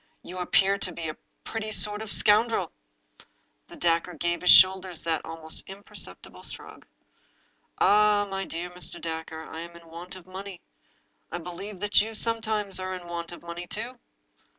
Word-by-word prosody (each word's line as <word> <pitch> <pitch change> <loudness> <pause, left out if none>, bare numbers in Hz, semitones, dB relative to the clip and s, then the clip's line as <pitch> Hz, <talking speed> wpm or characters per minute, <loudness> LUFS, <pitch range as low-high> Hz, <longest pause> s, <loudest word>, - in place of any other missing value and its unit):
" - - -43
You 180 +1 -5
appear 195 +2 +3
to 185 - +1
be 165 -1 -4
a 155 - -6 0.3
pretty 220 -1 -4
sort 210 0 +3
of 220 - -6
a - - +1
scoundrel." 220 +2 +4 1.0
The - - -12
stranger 170 +1 +1
gave 175 +2 -1
his 180 - +2
shoulders 185 -2 +7
that 165 -2 0
almost 160 -1 -2
imperceptible 195 - -6
shrug. - - -6 0.5
" - - -40
Oh, 210 0 +5
my 195 -1 -3
dear 170 +2 -4
Dacre, 160 -2 -4
I 160 - -8
am 170 +1 -8
in 170 0 -13
want 175 +3 -7
of 185 -2 -11
money 190 0 -8 0.7
I - - -3
I - - 0
believe 180 +3 -7
that 205 0 +5
you 220 +1 -4
sometimes 215 -4 0
are 185 0 -3
in 180 -1 -8
want 170 0 -4
of 175 - -10
money, 170 +1 -6
too." 245 +6 -5
185 Hz, 175 wpm, -27 LUFS, 170-205 Hz, 1.0 s, shoulders